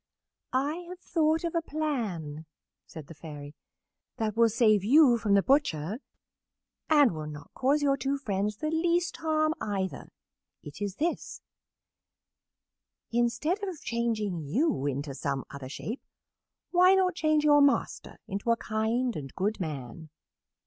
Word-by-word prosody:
"I 280 +5 0
have 360 - -7
thought 320 -2 +1
of 340 - -2
a 335 - +1
plan," 210 - -3 0.4
said 160 -3 -9
the 165 - -11
Fairy, 145 -2 -9 0.6
"that 220 -3 -1
will 230 0 +5
save 215 -3 +3
you 250 +1 +6
from 205 -2 +2
the 200 - +4
butcher, 220 - +1 0.9
and 290 -6 +6
will 155 -2 -5
not 150 -1 -9
cause 280 +3 +1
your 275 -1 +3
two 275 +1 -1
friends 210 -5 -2
the 310 +6 -2
least 340 +1 +1
harm, 310 -1 +1
either. 195 -3 -3 0.5
It 150 +7 -10
is 200 -2 -2
this: 335 +7 -3 1.7
"Instead 240 - 0
of 370 -6 -4
changing 225 -6 -1
you 155 - 0
into 140 +1 -3
some 135 -1 -3
other 140 -2 -8
shape, 220 - -5 0.7
why 365 +1 +6
not 370 -1 +2
change 310 -2 +2
your 290 -1 +6
master 280 -1 +1
into 200 +4 -4
a 230 - +4
kind 230 +3 -1
and 135 -3 -6
good 205 +4 -1
man?" 155 -2 -6
230 Hz, 140 wpm, -28 LUFS, -, 1.7 s, you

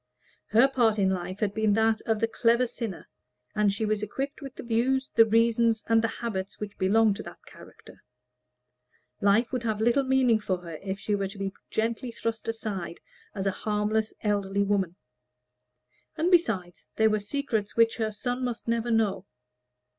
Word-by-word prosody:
Her 230 +5 +5
part 235 -5 +2
in 190 -2 +2
life 185 +2 -4
had 205 -2 0
been 220 -1 +2
that 220 0 +2
of 220 -1 +1
the 225 - +2
clever 235 +2 +2
sinner, 230 -5 -6 0.5
and 210 -2 +2
she 205 +3 -2
was 215 -1 0
equipped 270 +9 -4
with 275 -2 -8
the - - -8
views, 250 +3 0
the 225 - +6
reasons, 230 0 +3
and 225 0 +4
the 225 - +1
habits 210 -4 -5
which 210 -1 -6
belonged 205 +2 +3
to - - -5
that - - -12
character; - - -15 1.2
life 210 +5 +3
would 250 - -1
have 220 -3 -2
little 240 +5 +3
meaning 260 -4 +3
for 190 -3 -1
her 165 -3 -7
if 195 0 -4
she 210 - -2
were 200 -1 0
to 195 - -10
be 195 -1 -3 0.2
gently 230 +3 -1
thrust 230 -1 -4
aside 205 -7 -4 0.4
as 195 -1 -3
a 195 - +2
harmless 210 +2 -1
elderly 200 -1 +1
woman. 195 -4 0 1.2
And 335 +4 +1
besides, 205 - +1
there 220 0 +4
were 215 - +1
secrets 220 -1 -2
which 230 0 +4
her 220 -2 -1
son 245 +4 -3
must 240 -2 -4
never 230 0 0
know. 215 -4 +1
220 Hz, 175 wpm, -27 LUFS, 200-230 Hz, 1.2 s, the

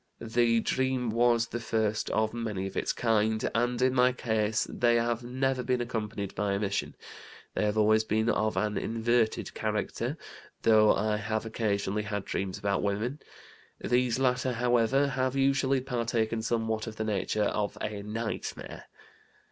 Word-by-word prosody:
The 115 0 +2
dream 130 -2 0
was 115 0 +3
the 120 - -3
first 110 -2 -1
of 110 0 0
many 110 -5 -3
of 95 - -6
its - - 0
kind, 110 -2 +1
and 120 +1 0
in 130 0 +3
my 125 0 +4
case 110 -3 0
they 120 -1 +2
have 120 0 +1
never 130 +1 -1
been 125 0 0
accompanied 110 -4 -3
by 100 -1 -1
emission. 100 0 -2 0.6
They - - 0
have 105 +1 0
always 110 +1 +4
been 110 +1 0
of 110 -1 +1
an 105 -1 0
'inverted' 115 0 0
character, - - -2 0.5
though 110 -1 +6
I 105 +1 0
have 110 +1 -2
occasionally 105 -2 -1
had 105 -2 -4
dreams 95 -1 -3
about 100 -1 0
women. 110 +8 -1 0.6
These 125 -1 +1
latter, 130 -1 +1
however, 120 +3 +2
have 130 0 -1
usually 135 0 +2
partaken 115 -3 -1
somewhat 110 -1 -1
of 110 - -6
the 110 - -3
nature 105 0 0
of 105 0 -1
a 105 -1 -4
nightmare! 110 +2 -5
115 Hz, 155 wpm, -29 LUFS, 105-120 Hz, 0.6 s, though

